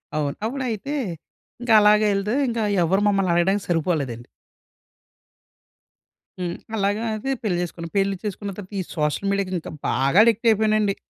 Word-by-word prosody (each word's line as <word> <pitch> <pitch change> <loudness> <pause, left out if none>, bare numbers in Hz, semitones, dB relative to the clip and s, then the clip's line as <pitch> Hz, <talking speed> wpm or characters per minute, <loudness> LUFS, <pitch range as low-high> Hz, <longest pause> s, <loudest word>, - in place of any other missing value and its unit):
అవును. 150 -1 -1
అప్పుడైతే 255 +2 -3 0.7
ఇంక 245 -1 -1
అలాగెళ్తే 210 0 +3
ఇంక 235 -1 -2 0.2
ఎవ్వరూ 190 +4 +2
మమ్మల్ని 195 -3 +2
అడగడానికి 190 +4 +1
సరిపోలేదండి. 150 -8 -1 2.1
హ్మ్. 175 -1 -3 0.2
అలాగా 205 +2 0
అయితే 240 +6 -3
పెళ్లి 190 -5 0
చేసుకున్నా. 170 -1 -6
పెళ్లి 195 0 +1
చేసుకున్న 205 -1 -4
తర్వాత 205 0 -10
ఈ - - 0
సోషల్ 150 +5 -1
మీడియాకి 195 -2 -1
ఇంకా - - -9 0.2
బాగా 135 +7 +1
అడిక్ట్ 230 0 +2
అయిపోయానండి. 215 -2 +2
200 Hz, 130 wpm, -23 LUFS, 175-215 Hz, 2.1 s, అలాగెళ్తే